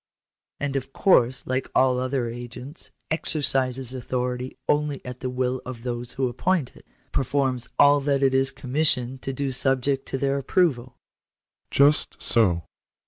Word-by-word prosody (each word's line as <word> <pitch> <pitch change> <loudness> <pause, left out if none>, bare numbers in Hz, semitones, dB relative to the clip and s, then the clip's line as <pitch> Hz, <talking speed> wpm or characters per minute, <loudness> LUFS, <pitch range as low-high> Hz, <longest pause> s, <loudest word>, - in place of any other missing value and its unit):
" - - -68
And 145 -1 -2
of 135 0 -4
course, 130 -9 +3
like 130 +1 -2
all 130 -1 +3
other 130 -1 -1
agents, 120 +5 -8 0.2
exercises 135 -5 +2
authority 125 0 -3
only 150 -1 +1
at 125 0 -7
the 130 - -3
will 125 0 -1
of 125 -2 -8
those 120 -1 -4
who 135 -1 0
appoint 145 +4 -1
it - - -18
— - - -39
performs 130 -2 -1
all 145 0 +6
that 140 -1 +1
it 135 -1 +3
is 135 0 +3
commissioned 130 -1 +1
to 135 - -3
do 135 +1 -3
subject 135 +1 +1
to 135 - -2
their 140 +1 0
approval?" 130 -5 0 0.4
" - - -68 0.3
Just 145 +2 +2
so." 90 -8 +2
130 Hz, 160 wpm, -24 LUFS, 125-140 Hz, 0.4 s, all